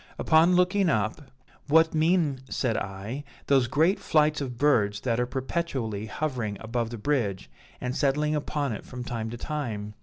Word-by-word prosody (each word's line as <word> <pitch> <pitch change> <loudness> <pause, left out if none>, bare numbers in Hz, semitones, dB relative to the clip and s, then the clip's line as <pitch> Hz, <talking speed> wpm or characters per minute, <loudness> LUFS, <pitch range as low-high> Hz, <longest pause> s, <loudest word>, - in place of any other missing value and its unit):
Upon 165 +3 +4
looking 180 +1 +3
up, 110 0 0 0.5
'What 160 +2 +4
mean,' 160 -3 +2
said 120 -4 0
I, 100 +8 -4 0.2
'those 135 -3 +3
great 160 - +2
flights 150 -1 +2
of 125 -4 -4
birds 105 -7 +2
that 120 -2 0
are 125 - +1
perpetually 130 - -3
hovering 120 -6 -3
about 115 0 -2
the 120 - -6
bridge 105 - -1 0.3
and 125 +1 -3
settling 150 +1 +1
upon 145 -2 -1
it - - -6
from 125 0 -7
time 115 -2 -4
to 120 - -6
time? 115 -8 -4
130 Hz, 160 wpm, -27 LUFS, 110-150 Hz, 0.5 s, Upon